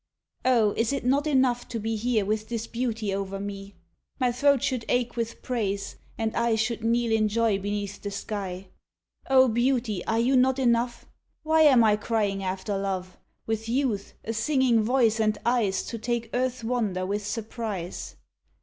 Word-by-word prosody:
Oh, 235 Hz, -5 st, +4 dB
is 230 Hz, +3 st, 0 dB
it 275 Hz, -, -3 dB
not 280 Hz, +4 st, +2 dB
enough 260 Hz, -4 st, +2 dB
to 230 Hz, -, -4 dB
be 225 Hz, +1 st, -2 dB
Here 220 Hz, -1 st, 0 dB
with 215 Hz, +1 st, -2 dB
this 230 Hz, -1 st, -3 dB
beauty 230 Hz, -4 st, -2 dB
over 195 Hz, 0 st, -3 dB
me? 200 Hz, 0 st, -7 dB, 0.4 s
My 250 Hz, -2 st, +2 dB
throat 280 Hz, +1 st, +3 dB
should 255 Hz, -4 st, 0 dB
ache 245 Hz, -1 st, 0 dB
with 230 Hz, -1 st, -4 dB
praise, 200 Hz, -5 st, -2 dB, 0.2 s
and 225 Hz, 0 st, -2 dB
I 235 Hz, -1 st, +2 dB
Should 220 Hz, +1 st, -1 dB
kneel 235 Hz, 0 st, +1 dB
in 220 Hz, -1 st, +3 dB
joy 220 Hz, -1 st, +1 dB
beneath 205 Hz, 0 st, -4 dB
the 205 Hz, -, -4 dB
sky. 195 Hz, -2 st, -5 dB, 0.6 s
O, 260 Hz, -1 st, +6 dB
beauty, 240 Hz, -4 st, 0 dB
are 225 Hz, -, +1 dB
you 245 Hz, +4 st, +3 dB
not 260 Hz, +1 st, +4 dB
enough? 240 Hz, -2 st, +1 dB, 0.4 s
Why 315 Hz, +1 st, +3 dB
am 270 Hz, -6 st, +7 dB
I 210 Hz, -1 st, +4 dB
crying 205 Hz, -3 st, -1 dB
after 190 Hz, +2 st, -2 dB
love, 190 Hz, -2 st, -3 dB, 0.3 s
With 225 Hz, 0 st, -3 dB
youth, 240 Hz, -6 st, -1 dB
a 225 Hz, -, -3 dB
singing 250 Hz, -1 st, +2 dB
voice, 230 Hz, -1 st, +2 dB
and 215 Hz, -1 st, +2 dB
eyes 230 Hz, -5 st, +1 dB
To 230 Hz, -, -5 dB
take 235 Hz, 0 st, -2 dB
earth's 250 Hz, -1 st, -1 dB
wonder 220 Hz, -6 st, -1 dB
with 205 Hz, +2 st, -2 dB
surprise? 210 Hz, -4 st, -5 dB
225 Hz, 170 wpm, -26 LUFS, 205-245 Hz, 0.6 s, am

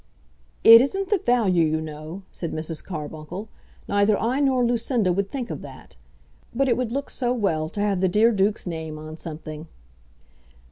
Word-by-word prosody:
"It 230 Hz, +1 st, +10 dB
isn't 385 Hz, +9 st, -2 dB
the 415 Hz, -, +3 dB
value, 220 Hz, -, +2 dB
you 155 Hz, 0 st, +1 dB
know," 155 Hz, +4 st, -7 dB
said 170 Hz, -, -5 dB
Mrs. 160 Hz, 0 st, -4 dB
Carbuncle; 160 Hz, +4 st, -7 dB, 0.4 s
"neither 205 Hz, +1 st, +2 dB
I 245 Hz, +5 st, 0 dB
nor 260 Hz, -3 st, +2 dB
Lucinda 235 Hz, -5 st, +1 dB
would 195 Hz, +2 st, -1 dB
think 255 Hz, -4 st, -4 dB
of -, -, -5 dB
that; -, -, -12 dB, 0.6 s
but 270 Hz, +3 st, +2 dB
it 240 Hz, -, +3 dB
would 245 Hz, -2 st, -2 dB
look 280 Hz, +3 st, -3 dB
so 245 Hz, -1 st, -1 dB
well 160 Hz, -9 st, 0 dB
to 205 Hz, -, -4 dB
have 200 Hz, -3 st, 0 dB
the 190 Hz, -, +3 dB
dear 215 Hz, +5 st, +4 dB
duke's 205 Hz, 0 st, 0 dB
name 160 Hz, -3 st, -5 dB
on 155 Hz, +1 st, -9 dB
something." 155 Hz, 0 st, -7 dB
200 Hz, 175 wpm, -24 LUFS, 160-240 Hz, 0.6 s, It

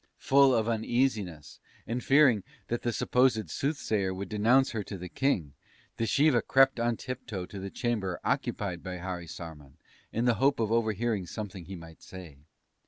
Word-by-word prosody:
"Full 135 Hz, -1 st, +5 dB
of 110 Hz, -1 st, +1 dB
uneasiness, 110 Hz, -, -1 dB, 0.3 s
and 120 Hz, +2 st, -3 dB
fearing 135 Hz, -6 st, +5 dB, 0.3 s
that 120 Hz, -, -1 dB
the 120 Hz, -, 0 dB
supposed 115 Hz, -7 st, +2 dB
Soothsayer 110 Hz, -10 st, -1 dB
would 95 Hz, 0 st, -5 dB
denounce 120 Hz, +6 st, +3 dB
her 110 Hz, -, -2 dB
to 100 Hz, -, -6 dB
the 90 Hz, 0 st, -7 dB
King, 90 Hz, -, 0 dB, 0.5 s
Dschiva 125 Hz, +2 st, +3 dB
crept 135 Hz, -2 st, +4 dB
on 120 Hz, -1 st, +1 dB
tiptoe 120 Hz, -7 st, -5 dB
to 100 Hz, -, -9 dB
the 100 Hz, +1 st, -5 dB
chamber 105 Hz, -6 st, -2 dB
occupied 90 Hz, -4 st, -1 dB
by 90 Hz, 0 st, -5 dB
Harisarman, 85 Hz, -5 st, -7 dB, 0.3 s
in 115 Hz, +2 st, -1 dB
the 120 Hz, -, +4 dB
hope 140 Hz, -1 st, +3 dB
of 110 Hz, -1 st, 0 dB
overhearing 110 Hz, -3 st, 0 dB
something 100 Hz, -3 st, -6 dB
he 95 Hz, -, -7 dB
might 85 Hz, -2 st, -12 dB
say. 85 Hz, -7 st, -11 dB
110 Hz, 160 wpm, -29 LUFS, 90-120 Hz, 0.5 s, Full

